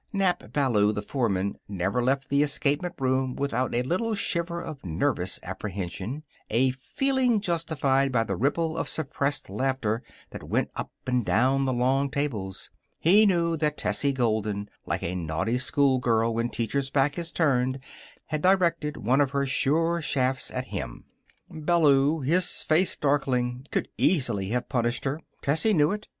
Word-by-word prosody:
Nap 195 Hz, -3 st, 0 dB
Ballou, 115 Hz, -8 st, +2 dB
the 105 Hz, -1 st, -4 dB
foreman, 100 Hz, -6 st, -1 dB
never 100 Hz, +4 st, -1 dB
left 135 Hz, +2 st, 0 dB
the 140 Hz, +1 st, +3 dB
escapement 150 Hz, +4 st, 0 dB
room 130 Hz, -1 st, 0 dB
without 130 Hz, -3 st, -1 dB
a 120 Hz, -, +1 dB
little 215 Hz, -, -1 dB
shiver 170 Hz, -3 st, -1 dB
of 155 Hz, -5 st, -8 dB
nervous 80 Hz, -4 st, -1 dB
apprehension 100 Hz, -, -5 dB, 0.3 s
a 130 Hz, +4 st, +3 dB
feeling 250 Hz, -, 0 dB
justified 150 Hz, -7 st, 0 dB
by 115 Hz, -3 st, +2 dB
the 100 Hz, -3 st, -3 dB
ripple 160 Hz, -, 0 dB
of -, -, -2 dB
suppressed 140 Hz, -2 st, -1 dB
laughter 115 Hz, +1 st, -1 dB, 0.3 s
that -, -, -8 dB
went -, -, -1 dB
up -, -, -4 dB, 0.2 s
and 125 Hz, -1 st, +1 dB
down 130 Hz, +6 st, +2 dB
the 130 Hz, -, +1 dB
long 130 Hz, +3 st, +1 dB
tables. 115 Hz, -10 st, -3 dB, 0.3 s
He 205 Hz, +6 st, +5 dB
knew 170 Hz, -3 st, +2 dB
that 150 Hz, -1 st, 0 dB
Tessie 140 Hz, -, +1 dB
Golden, 110 Hz, -5 st, -1 dB, 0.2 s
like -, -, -2 dB
a 85 Hz, -, -2 dB
naughty 85 Hz, +7 st, -1 dB
schoolgirl 125 Hz, -5 st, +2 dB
when 115 Hz, +1 st, -1 dB
teacher's 130 Hz, +5 st, -2 dB
back 140 Hz, +3 st, +1 dB
is 165 Hz, -1 st, -4 dB
turned, 130 Hz, -5 st, +1 dB, 0.5 s
had 155 Hz, -1 st, -3 dB
directed 170 Hz, -5 st, +2 dB
one 130 Hz, +6 st, +2 dB
of 140 Hz, -, +2 dB
her 140 Hz, 0 st, 0 dB
sure 165 Hz, +5 st, +1 dB
shafts 130 Hz, -3 st, 0 dB
at 130 Hz, 0 st, -5 dB
him. -, -, -5 dB, 0.4 s
Ballou, 155 Hz, -2 st, +2 dB
his 175 Hz, +7 st, +1 dB
face 165 Hz, +4 st, +3 dB
darkling, 130 Hz, -3 st, 0 dB
could -, -, -1 dB
easily 120 Hz, -, +2 dB
have 125 Hz, +2 st, -1 dB
punished 120 Hz, -2 st, -1 dB
her. 140 Hz, +4 st, -2 dB, 0.2 s
Tessie 160 Hz, +9 st, +3 dB
knew 150 Hz, +2 st, +4 dB
it. 210 Hz, +1 st, -5 dB
135 Hz, 155 wpm, -26 LUFS, 120-155 Hz, 0.5 s, He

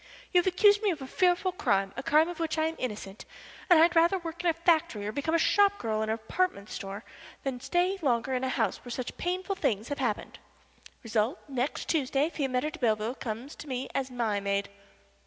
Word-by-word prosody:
'You 360 Hz, -, +7 dB
have 355 Hz, -, 0 dB
accused 410 Hz, +3 st, +5 dB
me 425 Hz, -, +2 dB
of 335 Hz, -5 st, -1 dB
a 265 Hz, -, -6 dB
fearful 360 Hz, +5 st, +2 dB
crime 195 Hz, -, 0 dB
a -, -, -4 dB
crime 305 Hz, +4 st, +4 dB
of 350 Hz, -1 st, -6 dB
which 325 Hz, -1 st, -1 dB
I 315 Hz, -, +2 dB
am 320 Hz, +1 st, -2 dB
innocent 210 Hz, -4 st, -5 dB, 0.5 s
and 350 Hz, -, +8 dB
I'd 340 Hz, +2 st, +5 dB
rather 335 Hz, +3 st, +5 dB
work 340 Hz, -1 st, -6 dB
in 350 Hz, -, +3 dB
a -, -, +3 dB
factory, 330 Hz, -, +1 dB
or 210 Hz, -, -2 dB
become 285 Hz, +7 st, -1 dB
a -, -, +6 dB
shop 405 Hz, +4 st, +4 dB
girl 220 Hz, -2 st, -1 dB
in 220 Hz, -, -1 dB
a 220 Hz, -, 0 dB
department 220 Hz, -, -2 dB
store, 200 Hz, +1 st, -6 dB, 0.4 s
than 265 Hz, -2 st, -3 dB
stay 360 Hz, +7 st, 0 dB
longer 260 Hz, -2 st, +1 dB
in 255 Hz, 0 st, -1 dB
a 260 Hz, -, 0 dB
house -, -, -1 dB
where 245 Hz, -, -9 dB
such 245 Hz, +1 st, -4 dB
painful 370 Hz, +2 st, -2 dB
things 215 Hz, -, -1 dB
have 285 Hz, -, -3 dB
happened.' -, -, -2 dB, 0.6 s
Result, 225 Hz, -, 0 dB
next 265 Hz, 0 st, -2 dB
Tuesday 290 Hz, 0 st, +1 dB
Fiametta 270 Hz, 0 st, -1 dB
de -, -, -10 dB
Belleville 220 Hz, -1 st, +1 dB
comes 250 Hz, +2 st, -6 dB
to -, -, -10 dB
me 260 Hz, -1 st, -3 dB
as 270 Hz, -1 st, -1 dB
my 230 Hz, -5 st, -1 dB
maid." 200 Hz, 0 st, -1 dB
275 Hz, 215 wpm, -29 LUFS, 225-340 Hz, 0.6 s, and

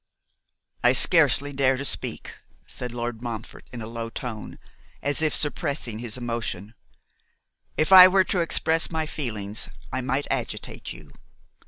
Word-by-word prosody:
'I -, -, +5 dB
scarcely 145 Hz, +1 st, +4 dB
dare 135 Hz, -1 st, +2 dB
to 140 Hz, -, -3 dB
speak,' -, -, -1 dB, 0.3 s
said 125 Hz, -1 st, -6 dB
Lord 120 Hz, -1 st, -5 dB
Montfort, 115 Hz, -3 st, -7 dB
in 120 Hz, -2 st, -7 dB
a -, -, -6 dB
low 115 Hz, 0 st, -5 dB
tone, 115 Hz, -3 st, -7 dB, 0.5 s
as 145 Hz, +2 st, +2 dB
if 155 Hz, -1 st, +2 dB
suppressing 145 Hz, -, -1 dB
his 120 Hz, 0 st, -4 dB
emotion, 115 Hz, -4 st, -4 dB, 1.0 s
'if 155 Hz, +4 st, +1 dB
I 185 Hz, -1 st, +11 dB
were 190 Hz, +1 st, +4 dB
to 185 Hz, -, -1 dB
express 165 Hz, -1 st, +1 dB
my 160 Hz, -1 st, -2 dB
feelings, 110 Hz, -9 st, -4 dB, 0.2 s
I -, -, -1 dB
might 130 Hz, +3 st, -1 dB
agitate -, -, -4 dB
you. -, -, -12 dB
130 Hz, 145 wpm, -25 LUFS, 115-155 Hz, 1.0 s, I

